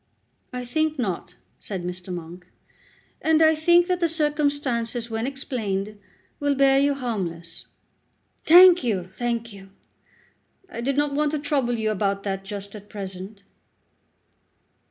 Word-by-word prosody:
"I 250 -1 -5
think 310 +4 0
not," 185 -6 -3 0.2
said 190 -4 -5
Mr. 180 +1 -6
Monk, 175 +1 -8 0.7
"and 320 0 +3
I 320 0 +6
think 345 +3 +4
that 360 -1 0
the 340 -2 +2
circumstances, 285 -7 -1
when 225 +2 -2
explained, 215 -7 -3 0.4
will 285 -1 +1
bear 270 0 +4
you 285 0 +2
harmless." 180 -10 -4 0.8
"Thank 360 0 +8
you; 190 -7 -1
thank 235 -1 -3
you. 195 -1 -13 1.0
I 235 - -7
did 275 +3 -1
not 290 -1 +1
want 300 +1 0
to - - +1
trouble 275 -4 0
you 220 -1 0
about 200 -1 -1
that 195 -1 -3
just 200 0 -7
at 205 -1 -11
present." 195 0 -8
235 Hz, 135 wpm, -24 LUFS, 195-290 Hz, 1.0 s, Thank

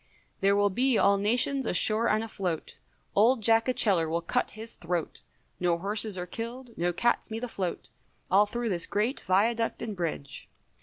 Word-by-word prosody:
There 200 +1 +3
will 205 0 +2
be 250 +4 +2
all 200 0 +4
nations 245 +5 +2
ashore 215 +5 +2
and 215 +1 +1
afloat, 185 -7 -4 0.4
Old 225 +3 +4
Jack 225 +2 +4
Atcheler 195 -10 +2
will 170 +1 -1
cut - - 0
his 225 +1 -7
throat, 170 -1 -4 0.4
No 175 -1 +1
horses 205 +2 0
are 180 - -3
killed, 235 +6 -7
no 175 +1 0
cat's 235 +7 0
meat 225 +2 -5
afloat, 195 -7 -4 0.4
All 205 +2 +5
through 235 +2 -3
this 175 -4 0
great 220 +7 -1
Viaduct 225 +5 +1
and 215 -3 -4
Bridge. 165 -5 -5
210 Hz, 165 wpm, -28 LUFS, 180-230 Hz, 0.4 s, All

